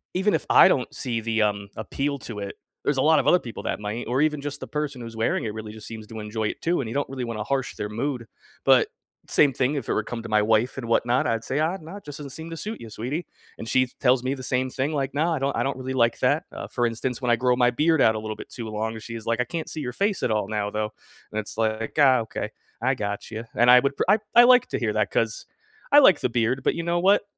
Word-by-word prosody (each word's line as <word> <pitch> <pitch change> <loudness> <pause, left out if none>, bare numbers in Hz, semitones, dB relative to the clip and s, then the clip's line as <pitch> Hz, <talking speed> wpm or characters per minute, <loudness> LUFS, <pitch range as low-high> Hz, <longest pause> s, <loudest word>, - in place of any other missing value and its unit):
even 190 +3 +2
if - - 0
I - - +8
don't 130 -9 +1
see 120 -3 -2
the, 110 -1 +1
um, 100 -1 -1
appeal 140 +6 -2
to 115 -4 -7
it, 100 -1 -5 0.3
there's 145 - +1
a - - +3
lot 155 0 +5
of - - -1
other 180 - +6
people 120 -7 -8
that - - -2
might 105 +3 -4
or 125 +4 +1
even 150 -2 0
just 145 0 -5
the - - -6
person 150 -4 -3
who's 115 -1 -8
wearing 110 0 0
it 105 - -3
really 110 -1 -7
just 110 -1 -11
seems 110 -1 -8
to 110 0 -8
enjoy 110 +1 -3
it - - -5
too, 170 -2 +1
and 115 - -5
you 115 - -6
don't 145 - -1
really 130 -2 -4
wanna 115 -2 -4
harsh 135 +1 -2
their 105 - -4
mood. 120 +2 -3 0.4
But, - - +5 0.4
same 145 - +4
thing, 130 +3 0
if 135 -5 -4
it - - +2
were - - +1
come 115 +1 -6
to 115 - -7
my 105 0 +3
wife 110 +4 +2
and 120 -3 -5
whatnot, 120 +2 +2
I'd 115 -1 -1
say, 135 +5 -2
"Ah, 165 +5 +1
nah, 165 +6 -9
it 205 - -14
just 145 -1 -7
doesn't 145 -2 -7
seem 160 +3 -7
to 165 - -6
suit 215 +6 -5
you, 115 - -9
sweetie," 125 +11 -4 0.3
and 115 - -6
she 130 -1 +3
tells 125 -1 +3
me 130 +1 0
the 135 - -7
same 130 0 0
thing, 135 +4 -1
like, 140 -2 -1
"Nah, 160 +3 +1
I - - -3
don't 135 +1 -1
I - - 0
don't 135 -1 -1
really 130 0 -4
like 115 -2 +2
that." - - +2
Uh, - - -6
for 120 - -1
instance, 115 +2 -3
when 125 - -1
I 120 - +5
grow 125 +1 +2
my 125 -1 +4
beard 150 +5 +2
out 110 - +5
a - - -2
little 110 0 -5
bit - - -10
too 115 -3 -7
long, 110 +1 -3
she's 115 0 -8
like, 115 +1 0
"I - - +2
can't 160 +6 -5
see 155 - -5
your 125 - -3
face 200 +4 0
at 115 - +1
all 105 -2 0
now, 105 -1 -2
though," 105 0 -2 0.4
and 110 - -2
it's 110 0 -7
like, 110 +2 -1
"Ah, 130 -3 +6
okay. 110 -1 -4 0.3
I 130 +2 +2
gotcha," 110 +1 -5
and 120 +1 +4
I 125 0 +9
would 140 0 0
pr - - +1
I 210 +3 +5 0.2
I 240 - +10
like 250 0 +6
to - - -2
hear - - 0
that, - - 0
'cause - - -1 0.5
I 290 - +9
like 190 - +6
the 125 - +1
beard, 120 +2 0
but - - +2
you 170 - -3
know 170 +1 0
what? 195 +4 +4
125 Hz, 290 wpm, -25 LUFS, 110-145 Hz, 0.5 s, I